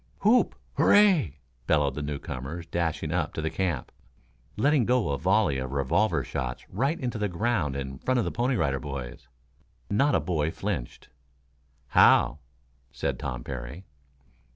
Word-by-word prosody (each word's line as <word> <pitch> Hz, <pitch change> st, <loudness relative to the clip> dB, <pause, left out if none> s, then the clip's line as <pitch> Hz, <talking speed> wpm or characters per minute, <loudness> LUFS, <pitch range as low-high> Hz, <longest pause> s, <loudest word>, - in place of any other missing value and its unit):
"Whoop! 225 Hz, +5 st, +4 dB, 0.2 s
Hooray!" 180 Hz, -, +5 dB, 0.3 s
bellowed 75 Hz, -3 st, +2 dB
the 75 Hz, -, -5 dB
newcomers, 75 Hz, +2 st, -5 dB
dashing 85 Hz, -1 st, -2 dB
up -, -, -1 dB
to -, -, -2 dB
the 80 Hz, -, -1 dB
camp, 85 Hz, -9 st, -2 dB, 0.7 s
letting 140 Hz, +3 st, +3 dB
go 125 Hz, -7 st, +2 dB
a 70 Hz, -, -1 dB
volley 95 Hz, -6 st, +2 dB
of 65 Hz, +1 st, -5 dB
revolver 70 Hz, -2 st, +1 dB
shots -, -, -5 dB
right 135 Hz, -, 0 dB
into 120 Hz, -3 st, -3 dB
the 105 Hz, -1 st, 0 dB
ground 90 Hz, -, 0 dB
in 65 Hz, -1 st, -5 dB
front 130 Hz, 0 st, 0 dB
of 120 Hz, -, +1 dB
the -, -, -2 dB
Pony 125 Hz, +2 st, 0 dB
Rider 70 Hz, -, 0 dB
Boys. 65 Hz, -3 st, -7 dB, 0.6 s
Not 140 Hz, +8 st, +3 dB
a -, -, +4 dB
boy 75 Hz, -1 st, -1 dB
flinched. 80 Hz, -6 st, -5 dB, 0.8 s
"How!" 75 Hz, -, +5 dB, 0.5 s
said 65 Hz, -, -3 dB
Tom 60 Hz, -3 st, -4 dB
Parry. 65 Hz, +7 st, -7 dB
80 Hz, 150 wpm, -27 LUFS, 70-110 Hz, 0.8 s, Hooray